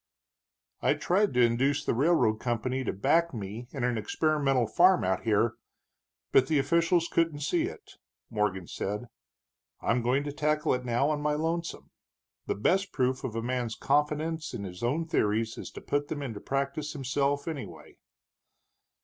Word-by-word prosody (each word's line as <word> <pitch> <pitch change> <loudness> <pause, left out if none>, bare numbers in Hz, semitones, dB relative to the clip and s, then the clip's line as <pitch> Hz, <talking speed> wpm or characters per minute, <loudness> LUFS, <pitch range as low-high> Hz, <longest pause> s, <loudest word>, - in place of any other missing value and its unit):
"I - - +3
tried 190 -5 +1
to 125 - +5
induce 130 +4 +1
the - - +1
railroad 125 -5 +3
company 125 +2 -1
to - - 0
back 165 - +2
me 110 +3 -6
in 135 -4 -4
an 120 -2 +1
experimental 140 -1 +1
farm 180 - +4
out 95 +3 -1
here, 110 +1 +2 0.7
but 130 - +5
the 155 - +2
officials 170 +4 +2
couldn't 165 -4 0
see 325 - +1
it," 415 +3 -9 0.3
Morgan 105 -4 0
said. 105 +7 -4 0.7
"I'm 120 +1 +1
going 125 +4 +1
to 145 - -4
tackle 150 +1 +1
it 125 0 -2
now 125 +5 +1
on 150 -1 -1
my 150 0 +1
lonesome. 165 +2 -3 0.6
The - - 0
best 190 - +1
proof 130 0 0
of 120 -4 -4
a 115 - -2
man's 125 -2 -2
confidence 150 +3 0
in 100 - -5
his 90 -2 -8
own 145 +8 0
theories 110 -6 0
is - - -7
to - - -8
put 145 0 -1
them 145 -2 -4
into 115 -6 -5
practice 140 +3 -2
himself, 140 +1 -1
anyway." 155 -5 -7
135 Hz, 165 wpm, -29 LUFS, 120-155 Hz, 0.7 s, to